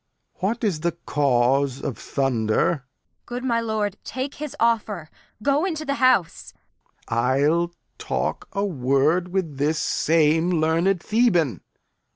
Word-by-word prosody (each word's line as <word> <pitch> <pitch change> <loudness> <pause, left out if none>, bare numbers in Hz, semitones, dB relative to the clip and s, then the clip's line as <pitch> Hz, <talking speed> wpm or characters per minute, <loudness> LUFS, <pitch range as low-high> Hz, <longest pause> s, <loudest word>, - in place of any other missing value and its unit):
What 205 +6 -1
is 195 -8 0
the 170 +1 -1
cause 135 -1 +2
of - - -4
thunder? 120 -6 0
Kent. 160 -5 -4 0.5
Good 245 +1 -5
my 235 -3 +1
lord, 215 -3 -2
take 260 +2 -4
his 300 -2 -6
offer; 215 -8 0 0.3
go 280 +3 +2
into 320 -5 -2
th' 280 - -1
house. 255 -10 +2 0.6
Lear. 115 - 0 0.3
I'll 170 +2 +1 0.3
talk - - -2
a 200 +1 -1
word 150 +2 +1
with 180 -6 -2
this 150 +3 +1
same 160 +2 +2
learned 165 +3 +1
Theban. 205 - +2
175 Hz, 135 wpm, -23 LUFS, 150-225 Hz, 0.6 s, cause